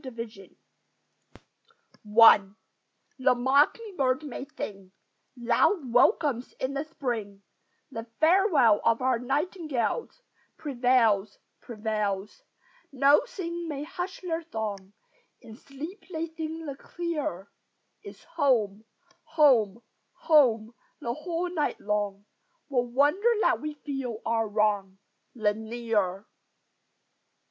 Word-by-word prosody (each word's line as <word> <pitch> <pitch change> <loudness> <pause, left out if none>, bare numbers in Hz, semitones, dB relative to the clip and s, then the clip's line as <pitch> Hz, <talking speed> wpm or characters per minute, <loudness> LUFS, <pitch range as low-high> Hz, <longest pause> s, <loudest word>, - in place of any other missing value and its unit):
THE 260 - -6
MINORCAN 225 -5 -9 1.6
I 205 -4 +8 0.7
The 255 -1 +3
mocking 285 - +2
bird 260 +1 +1
may 270 -1 -6
sing 195 -2 -7 0.4
Loud 240 - +1
welcomes 255 - +2
in 260 +1 -4
the 280 +1 -2
Spring; 230 -10 -5 0.5
The 225 -2 -6
farewell 315 - +4
of 230 +2 +2
our 255 -2 +2
nightingales 305 - -2 0.3
Prevails, 240 -7 +2 0.2
prevails! 210 -3 -3 0.5
No 280 +2 +5
thing 345 -2 -5
may 290 -2 -4
hush 355 +4 -6
their 335 -3 -2
song: 210 - -5 0.5
In 220 - -13
sleep 290 - -9
they 325 -1 -2
sing 320 0 -6
the 280 -2 -5
clearer 295 - -5 0.5
It's - - -12
"home, 245 -11 0 0.4
home, 255 - +3 0.3
home," 240 -8 +3 0.3
the 235 - -3
whole 340 +4 -3
night 300 -4 -1
long 205 -1 -2 0.4
What 245 -3 +1
wonder 295 - +3
that - - +2
we 305 0 -5
feel 270 -6 -5
our 225 -1 +1
wrong 205 -2 0 0.4
The 215 -3 +1
nearer! 220 -3 -2
255 Hz, 105 wpm, -27 LUFS, 220-310 Hz, 1.6 s, I